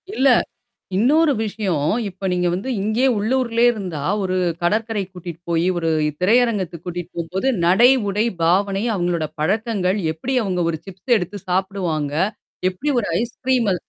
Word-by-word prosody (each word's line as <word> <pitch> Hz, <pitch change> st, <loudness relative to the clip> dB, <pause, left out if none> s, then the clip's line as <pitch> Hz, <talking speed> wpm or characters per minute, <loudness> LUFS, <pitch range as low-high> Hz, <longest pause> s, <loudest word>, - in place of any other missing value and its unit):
இல்ல. 270 Hz, +1 st, +4 dB, 0.7 s
இன்னொரு 295 Hz, +8 st, +4 dB
விஷயம். 200 Hz, -7 st, -2 dB, 0.3 s
இப்ப 190 Hz, 0 st, -5 dB
நீங்க 180 Hz, -1 st, +1 dB
வந்து 195 Hz, +8 st, -4 dB
இங்கே 220 Hz, +5 st, +1 dB
உள்ளூர்லே 235 Hz, +2 st, +1 dB
இருந்தா 180 Hz, -10 st, -5 dB, 0.2 s
ஒரு 185 Hz, -1 st, -1 dB, 0.3 s
கடற்கரைக்குக் 205 Hz, 0 st, -1 dB
கூட்டிட்டு 170 Hz, -2 st, -8 dB
போயி, 170 Hz, +1 st, +2 dB
ஒரு 165 Hz, -1 st, -1 dB, 0.3 s
திரையரங்கத்துக்கு 200 Hz, -5 st, +1 dB
கூட்டிட்டு 175 Hz, 0 st, -5 dB
போம்போது 185 Hz, +9 st, -2 dB, 0.2 s
நடை, 190 Hz, +8 st, +6 dB, 0.2 s
உடை, 210 Hz, +3 st, +1 dB, 0.2 s
பாவனை, 195 Hz, +4 st, +2 dB
அவுங்களோட 175 Hz, -3 st, 0 dB
பழக்கங்கள், 200 Hz, +2 st, 0 dB
எப்பிடி 245 Hz, +12 st, -4 dB
அவுங்க 180 Hz, -3 st, -1 dB
ஒரு 160 Hz, -, -4 dB
சிப்ஸ் 195 Hz, +6 st, -1 dB
எடுத்துச் 195 Hz, +1 st, -5 dB
சாப்பிடுவாங்க? 180 Hz, -6 st, -1 dB, 0.6 s
எப்படி 255 Hz, +11 st, -5 dB
ஒரு 210 Hz, -, -3 dB
ஐஸ்கிரீம்ம 240 Hz, -3 st, 0 dB
195 Hz, 135 wpm, -21 LUFS, 175-225 Hz, 0.7 s, நடை